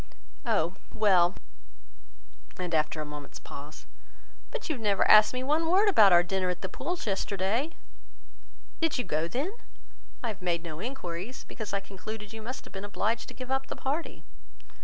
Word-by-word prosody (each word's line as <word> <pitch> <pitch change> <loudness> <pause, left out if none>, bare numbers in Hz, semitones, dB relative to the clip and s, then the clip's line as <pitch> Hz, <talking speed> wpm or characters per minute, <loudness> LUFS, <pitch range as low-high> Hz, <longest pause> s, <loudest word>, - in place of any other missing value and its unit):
"Oh! 185 -5 +1 0.2
well!" 185 -4 +5 1.2
and 180 -2 -3
after 155 0 +1
a - - -3
moment's 150 -1 -8
pause, 145 +3 -10 0.6
"but - - -5
you 320 - +1
have 250 - -7
never 205 -3 +3
asked 215 0 +8
me 255 0 -3
one 310 +4 +2
word 390 +5 +5
about 215 - +7
our 175 0 +7
dinner 185 +1 0
at 180 0 -3
the 190 - -2
Pooles 345 +6 -3
yesterday." 200 - 0 1.1
"Did 325 -3 +1
you 250 - 0
go 155 -4 0
then? 280 - -2 0.7
I 235 - 0
have 210 - -6
made 170 -2 0
no 160 -2 -6
enquiries, 220 -2 -5
because 220 -4 -6
I 200 0 0
concluded 210 +2 -8
you 220 - -7
must 255 +5 -6
have - - -14
been 195 0 -5
obliged 215 +3 -1
to - - -10
give 255 0 -6
up 265 0 0
the - - -4
party." 290 +5 -3
205 Hz, 180 wpm, -29 LUFS, 180-255 Hz, 1.2 s, asked